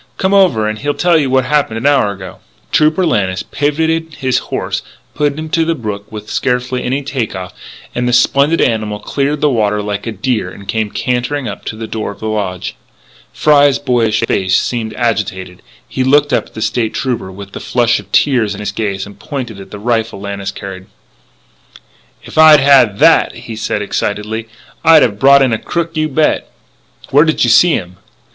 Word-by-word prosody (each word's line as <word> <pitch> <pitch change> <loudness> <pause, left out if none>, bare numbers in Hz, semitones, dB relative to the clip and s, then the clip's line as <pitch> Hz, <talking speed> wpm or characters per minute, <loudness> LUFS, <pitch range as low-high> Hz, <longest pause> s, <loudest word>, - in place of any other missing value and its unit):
Come 190 +1 0
over 175 - +3
and 110 0 -3
he'll 145 +1 -2
tell 175 -1 +2
you 145 -4 +2
what 130 -1 +2
happened 140 -5 0
an 115 - -5
hour 140 -8 +3
ago." 95 -2 -9 0.3
Trooper 155 +4 +3
Lannis 95 - 0
pivotted 160 +2 -1
his 130 -3 0
horse - - -2
and - - -25
put 145 -1 -1
him 155 0 -5
to 165 +1 +1
the 165 0 0
brook 105 -5 -6
with 105 -1 -8
scarcely 125 0 -1
any 135 +3 -1
take 130 -7 -3
off; 90 -1 -7 0.4
and 125 0 -1
the - - +1
splendid 140 +5 +3
animal 110 -2 0
cleared 140 +6 -2
the 150 - +3
water 105 -3 +1
like 105 +1 -4
a - - -2
deer 110 -2 -2
and 100 +1 -12
came 110 0 -1
cantering 125 +4 -2
up 100 - -7
to - - -4
the 110 +1 -6
door 110 0 -4
of - - -13
the - - -7
lodge. 100 -4 -3 0.6
Fry's 145 -2 +4
boyish 120 -5 +1
face 95 -4 +1
seemed 115 -3 -2
agitated; 95 -6 -2 0.3
he 130 - -2
looked 145 +3 +3
up - - +1
at - - -23
the 110 - -3
State 115 -3 -1
Trooper 125 -7 -2
with 100 +1 -10
the - - -7
flush 120 -1 +1
of 100 -1 -14
tears 115 -7 +2
in - - -9
his 105 - -3
gaze 100 -3 -3
and 100 0 -14
pointed 120 -8 -6
at 95 - -11
the - - -8
rifle 110 -1 -1
Lannis 100 -1 -5
carried: 95 -1 -8 1.4
"If - - -4
I'd 155 -1 +8
had 135 -7 +5
that," - - +4
he 115 - -8
said 105 -1 -2
excitedly, 105 +2 -3 0.4
"I'd 160 -1 +7
have 105 -4 -1
brought 140 0 +6
in 130 -3 +1
a 110 - -1
crook, 170 -1 -3
you 155 0 0
bet!" 150 +2 0 0.6
"Where 145 +2 +6
did 155 -1 +1
you 120 - +3
see 175 +7 +5
him?" 90 +1 -4
120 Hz, 200 wpm, -15 LUFS, 105-145 Hz, 1.4 s, I'd